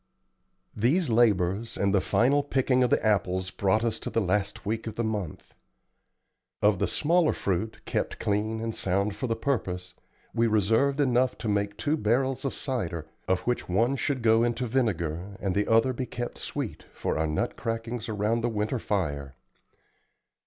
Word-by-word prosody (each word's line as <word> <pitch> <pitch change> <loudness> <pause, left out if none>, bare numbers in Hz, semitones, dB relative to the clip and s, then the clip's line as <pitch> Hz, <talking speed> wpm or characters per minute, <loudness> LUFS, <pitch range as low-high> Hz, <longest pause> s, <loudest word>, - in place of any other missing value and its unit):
These 135 - +2
labors 105 -2 +2
and 100 -1 +1
the 100 - +4
final 140 +9 +3
picking 130 -2 +1
of 125 - +3
the - - +2
apples 95 -3 +1
brought 100 +3 +1
us 115 -1 0
to - - -4
the - - +1
last 100 0 -1
week 110 +2 -2
of 110 - -5
the 115 - -1
month. 105 -7 -4 1.1
Of 105 -3 +3
the - - +1
smaller 165 +1 +2
fruit, 100 +3 -2
kept - - -2
clean 110 +2 -1
and 115 0 -2
sound 100 +2 0
for 130 - -3
the 115 - 0
purpose, 95 -8 -2 0.4
we 115 0 +2
reserved 115 +7 +2
enough 130 -2 +2
to 115 - -5
make 100 0 0
two 150 +4 0
barrels 130 +4 +1
of 135 - -1
cider, 85 - -2 0.2
of 95 -1 +1
which 125 -5 -2
one 115 +9 +2
should 135 -2 -1
go 115 0 +5
into 120 +1 0
vinegar, 100 -7 -1
and 95 -2 -1
the 100 +1 +1
other 115 +3 +4
be 125 +1 -4
kept 120 0 -5
sweet, - - -4
for - - -2
our 80 - +1
nut 75 0 -1
crackings 115 0 -4
around 110 +2 0
the 120 - 0
winter 110 +3 -1
fire. 70 -11 -2
110 Hz, 175 wpm, -27 LUFS, 100-120 Hz, 1.1 s, go